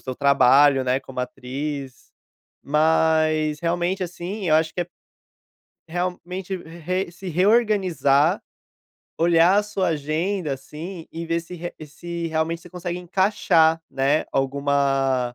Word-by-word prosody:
seu 130 Hz, -1 st, -5 dB
trabalho, 140 Hz, 0 st, +5 dB
né, 125 Hz, +1 st, +1 dB
como 130 Hz, -2 st, -11 dB
atriz, 135 Hz, +1 st, -6 dB, 0.5 s
mas, 155 Hz, 0 st, +2 dB
realmente 175 Hz, +3 st, -1 dB
assim, 180 Hz, +3 st, -5 dB
eu 155 Hz, -, +4 dB
acho 160 Hz, 0 st, +1 dB
que 180 Hz, -, -2 dB
é -, -, 0 dB, 1.0 s
realmente 180 Hz, +2 st, -4 dB
re 175 Hz, +2 st, -4 dB
se 180 Hz, +2 st, -9 dB
reorganizar, 185 Hz, -, +3 dB, 0.8 s
olhar 170 Hz, +3 st, +4 dB
a 210 Hz, -, +4 dB
sua 205 Hz, -2 st, -1 dB
agenda 160 Hz, +2 st, -1 dB
assim, 160 Hz, +6 st, -8 dB
e 165 Hz, +1 st, -6 dB
ver 165 Hz, 0 st, 0 dB
se 170 Hz, +2 st, -10 dB
re 175 Hz, 0 st, -6 dB
se 170 Hz, +3 st, -6 dB
realmente 160 Hz, +1 st, -1 dB
você 175 Hz, -, -14 dB
consegue 175 Hz, 0 st, -5 dB
encaixar, 175 Hz, -3 st, +2 dB
né, 135 Hz, +3 st, +1 dB
alguma 135 Hz, -2 st, +1 dB
165 Hz, 125 wpm, -23 LUFS, 140-180 Hz, 1.0 s, trabalho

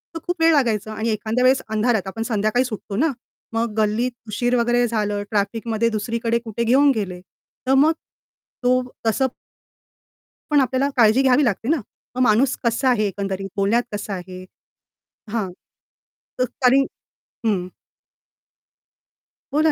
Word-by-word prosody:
तर -, -, -3 dB
खूप 355 Hz, -1 st, -2 dB
वेळ 325 Hz, 0 st, +6 dB
लागायचा 220 Hz, -6 st, +1 dB
आणि 220 Hz, +2 st, -2 dB
एखाद्या 220 Hz, +3 st, 0 dB
वेळेस 260 Hz, +1 st, +4 dB
अंधारात 220 Hz, -2 st, +1 dB
आपण 225 Hz, +4 st, -4 dB
संध्याकाळी 220 Hz, +2 st, +1 dB
सुटतो 215 Hz, -4 st, -6 dB
ना, 305 Hz, +7 st, +2 dB, 0.4 s
मग 225 Hz, -1 st, -1 dB
गल्लीत 220 Hz, +4 st, +1 dB, 0.2 s
उशीर 240 Hz, +4 st, 0 dB
वगैरे 240 Hz, 0 st, +2 dB
झालं 210 Hz, -2 st, -1 dB
ट्रॅफिकमध्ये 220 Hz, +2 st, 0 dB
दुसरीकडे 230 Hz, +2 st, -1 dB
कुठे 235 Hz, -1 st, -4 dB
घेऊन 270 Hz, +5 st, +5 dB
गेले, 190 Hz, -4 st, -3 dB
तर 255 Hz, +7 st, -6 dB
मग 290 Hz, +4 st, +5 dB, 0.7 s
तो 255 Hz, +1 st, +3 dB, 0.3 s
तसं 265 Hz, +4 st, +2 dB, 1.2 s
पण 290 Hz, -, +5 dB
आपल्याला 260 Hz, +2 st, +1 dB
काळजी 225 Hz, +2 st, +5 dB
घ्यावी 270 Hz, +2 st, +4 dB
लागते 225 Hz, +1 st, -1 dB
ना. 310 Hz, -5 st, +2 dB, 0.3 s
मग 255 Hz, -, 0 dB
माणूस 250 Hz, +3 st, +3 dB
कसा 235 Hz, +3 st, +2 dB
आहे 220 Hz, -4 st, +2 dB
एकंदरीत 195 Hz, 0 st, -4 dB
बोलण्यात 205 Hz, +5 st, +2 dB
कसा 205 Hz, 0 st, -4 dB
आहे 185 Hz, 0 st, -7 dB, 0.9 s
हां, 210 Hz, -6 st, -2 dB, 0.9 s
तर 255 Hz, -, +3 dB, 0.2 s
कारण 265 Hz, +2 st, +5 dB, 0.6 s
हं. 185 Hz, -4 st, 0 dB, 1.8 s
बोला 310 Hz, +2 st, +3 dB
230 Hz, 135 wpm, -22 LUFS, 210-255 Hz, 1.8 s, वेळ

